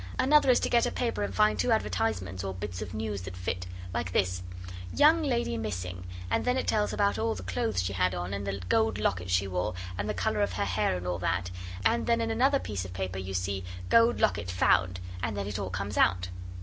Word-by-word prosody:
'Another 290 Hz, 0 st, +5 dB
is 250 Hz, -, +6 dB
to -, -, 0 dB
get 235 Hz, -1 st, +3 dB
a -, -, -2 dB
paper 235 Hz, -, -1 dB
and 100 Hz, -2 st, -2 dB
find 105 Hz, +1 st, +3 dB
two 85 Hz, -, +2 dB
advertisements 95 Hz, -2 st, 0 dB
or 95 Hz, -1 st, -3 dB
bits 95 Hz, 0 st, -5 dB
of 105 Hz, -4 st, -5 dB
news 110 Hz, -3 st, -3 dB
that 90 Hz, 0 st, -7 dB
fit. 90 Hz, 0 st, -3 dB, 0.3 s
Like 90 Hz, -, -2 dB
this: 90 Hz, -1 st, +1 dB, 0.5 s
"Young 315 Hz, +3 st, +5 dB
Lady 240 Hz, -, 0 dB
Missing," 90 Hz, -4 st, -4 dB, 0.2 s
and -, -, +2 dB
then 250 Hz, +1 st, +1 dB
it -, -, 0 dB
tells 210 Hz, -1 st, +1 dB
about 200 Hz, -, +1 dB
all 110 Hz, 0 st, 0 dB
the 95 Hz, -, -7 dB
clothes 90 Hz, +1 st, -1 dB
she 95 Hz, +2 st, -2 dB
had 90 Hz, 0 st, +1 dB
on, 90 Hz, +2 st, -3 dB
and 100 Hz, 0 st, -3 dB
the 100 Hz, 0 st, -3 dB
gold 110 Hz, 0 st, +2 dB
locket 90 Hz, -3 st, -1 dB
she 90 Hz, +2 st, +2 dB
wore, 90 Hz, +2 st, -2 dB, 0.2 s
and 100 Hz, +1 st, -2 dB
the 105 Hz, -, -1 dB
colour 105 Hz, -, 0 dB
of 100 Hz, -2 st, +1 dB
her 90 Hz, -, 0 dB
hair, 95 Hz, 0 st, +1 dB
and 90 Hz, -, -6 dB
all 90 Hz, 0 st, -1 dB
that; 90 Hz, 0 st, -1 dB, 0.3 s
and 115 Hz, +3 st, +2 dB
then 235 Hz, 0 st, +3 dB
in 225 Hz, 0 st, 0 dB
another 265 Hz, +5 st, +3 dB
piece 100 Hz, -, -4 dB
of 95 Hz, -1 st, -8 dB
the -, -, -9 dB
paper 95 Hz, 0 st, -3 dB
you 95 Hz, 0 st, -5 dB
see, 95 Hz, +1 st, -1 dB, 0.3 s
"Gold 230 Hz, +1 st, +5 dB
locket 100 Hz, -3 st, +1 dB
found," 90 Hz, 0 st, +2 dB, 0.2 s
and 110 Hz, -1 st, -2 dB
then 100 Hz, -, -2 dB
it 100 Hz, -1 st, -3 dB
all 95 Hz, -2 st, -3 dB
comes 100 Hz, +3 st, -3 dB
out. 90 Hz, -1 st, +3 dB
100 Hz, 240 wpm, -29 LUFS, 90-110 Hz, 0.5 s, is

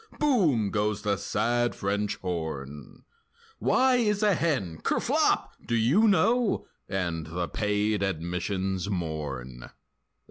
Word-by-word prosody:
Boom! 165 Hz, -, +2 dB
goes 105 Hz, -1 st, -1 dB
the 105 Hz, -1 st, +1 dB
sad 120 Hz, +4 st, 0 dB
French 100 Hz, +1 st, -1 dB
horn; 80 Hz, -5 st, -5 dB, 0.6 s
Why 260 Hz, -1 st, +3 dB
is 210 Hz, -3 st, +1 dB
a 210 Hz, -1 st, +4 dB
hen? 130 Hz, -, -1 dB
(Kerflop!) -, -, +1 dB, 0.2 s
Do 115 Hz, -, 0 dB
you 135 Hz, -, +4 dB
know?— 225 Hz, +3 st, +2 dB, 0.2 s
And 85 Hz, -5 st, -2 dB
the 85 Hz, +2 st, -3 dB
paid 105 Hz, 0 st, 0 dB
admissions 95 Hz, +2 st, -2 dB
mourn! 70 Hz, -9 st, -4 dB
100 Hz, 110 wpm, -27 LUFS, 85-125 Hz, 0.6 s, a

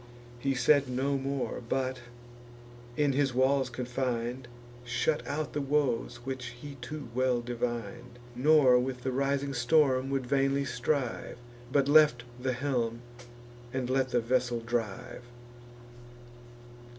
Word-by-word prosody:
He 135 Hz, +2 st, 0 dB
said 140 Hz, +1 st, +4 dB
no 135 Hz, +3 st, 0 dB
more, 135 Hz, -1 st, -2 dB
but, 130 Hz, -1 st, -1 dB, 1.0 s
in 145 Hz, -2 st, +2 dB
his 135 Hz, -2 st, +1 dB
walls 130 Hz, 0 st, +3 dB
confin'd, 125 Hz, 0 st, -3 dB, 0.4 s
Shut 125 Hz, +5 st, 0 dB
out 150 Hz, +1 st, -3 dB
the 145 Hz, -, -1 dB
woes 135 Hz, -4 st, 0 dB
which 130 Hz, -1 st, -4 dB
he 140 Hz, +1 st, -9 dB
too 140 Hz, +2 st, -6 dB
well 130 Hz, 0 st, +2 dB
divin'd 120 Hz, 0 st, -4 dB, 0.2 s
Nor 130 Hz, -1 st, +5 dB
with 125 Hz, 0 st, -3 dB
the 130 Hz, -, -1 dB
rising 140 Hz, +1 st, 0 dB
storm 130 Hz, 0 st, +3 dB
would 135 Hz, -2 st, -1 dB
vainly 135 Hz, +1 st, +1 dB
strive, 125 Hz, 0 st, -2 dB, 0.3 s
But 140 Hz, -1 st, +3 dB
left 145 Hz, -5 st, +5 dB, 0.2 s
the 130 Hz, 0 st, 0 dB
helm, 120 Hz, -3 st, -1 dB, 0.7 s
and 130 Hz, -1 st, -2 dB
let 130 Hz, 0 st, +1 dB
the 120 Hz, -1 st, +1 dB
vessel 120 Hz, 0 st, 0 dB
drive. 115 Hz, -2 st, -3 dB
130 Hz, 125 wpm, -30 LUFS, 120-140 Hz, 1.0 s, Nor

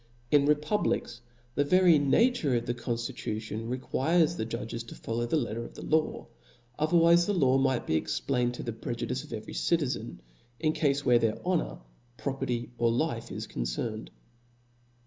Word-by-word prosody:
In 145 Hz, -1 st, +5 dB
republics, 150 Hz, -, 0 dB, 0.3 s
the 145 Hz, -, +2 dB
very 175 Hz, +1 st, +5 dB
nature 150 Hz, -, +3 dB
of 115 Hz, -, -1 dB
the 120 Hz, -, -1 dB
conftitution 115 Hz, -2 st, -4 dB
requires 155 Hz, +6 st, +1 dB
the 110 Hz, -, -3 dB
judges 115 Hz, 0 st, -4 dB
to -, -, -10 dB
follow 120 Hz, +1 st, -3 dB
the 160 Hz, -, +1 dB
letter 115 Hz, -4 st, -2 dB
of -, -, -11 dB
the -, -, -8 dB
law: 155 Hz, 0 st, 0 dB, 0.5 s
otherwife 170 Hz, +2 st, +5 dB
the 205 Hz, -, +1 dB
law 135 Hz, -5 st, +4 dB
might 135 Hz, -2 st, +1 dB
be 80 Hz, -, +1 dB
explained 125 Hz, -, -1 dB
to -, -, -6 dB
the 115 Hz, -, -3 dB
prejudice 120 Hz, +3 st, -4 dB
of 150 Hz, -, -14 dB
every 110 Hz, -2 st, -6 dB
citizen, 150 Hz, -, -1 dB, 0.4 s
in 155 Hz, -1 st, +1 dB
cafes 140 Hz, -2 st, +1 dB
where 120 Hz, -1 st, +5 dB
their 115 Hz, -2 st, +1 dB
honor, -, -, 0 dB, 0.4 s
property 125 Hz, -4 st, -3 dB
or 120 Hz, -1 st, +3 dB
life 120 Hz, -2 st, -1 dB
are -, -, -5 dB
concerned. 85 Hz, -, -3 dB
130 Hz, 160 wpm, -29 LUFS, 115-155 Hz, 0.5 s, In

